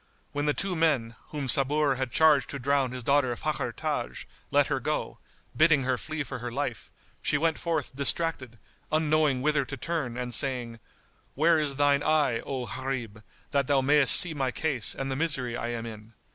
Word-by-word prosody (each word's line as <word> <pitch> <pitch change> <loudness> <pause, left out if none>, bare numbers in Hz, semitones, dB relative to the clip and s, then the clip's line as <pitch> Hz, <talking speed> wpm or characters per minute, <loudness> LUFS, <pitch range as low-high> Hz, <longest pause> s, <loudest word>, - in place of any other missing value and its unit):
When 145 +1 -2
the 150 - +3
two 195 -2 -1
men, 140 -9 +1
whom 145 -3 -5
Sabur 140 +3 +2
had 130 -1 -3
charged 150 -3 +4
to 140 - -5
drown 135 -1 0
his 125 -1 -6
daughter 140 -2 +2
Fakhr - - -2
Taj, 60 0 -4 0.2
let - - +3
her - - -1
go, - - -3 0.4
bidding 155 -3 +4
her 130 0 +1
flee 155 +4 -4
for 130 -2 -7
her 120 0 -5
life, 125 -3 -4 0.3
she - - +1
went 160 +1 0
forth 160 -6 -2
distracted, 140 -3 -2 0.3
unknowing 155 -4 +2
whither 150 -1 +2
to 140 +1 -7
turn 135 -4 -3
and 125 -1 -4
saying, 120 -2 -1 0.6
"Where 160 +3 +4
is 145 -2 -1
thine 145 0 +3
eye, 150 -6 +2
O 130 -1 -5
Gharib, 120 -2 -5 0.3
that 140 -2 +1
thou 140 -2 +3
mayst 140 0 +8
see 175 -3 +2
my 135 -3 -1
case 130 -3 -2
and 135 0 -4
the - - -1
misery 135 -6 -2
I 120 - -3
am 120 -1 -4
in?" 110 0 -10
140 Hz, 185 wpm, -27 LUFS, 125-150 Hz, 0.6 s, mayst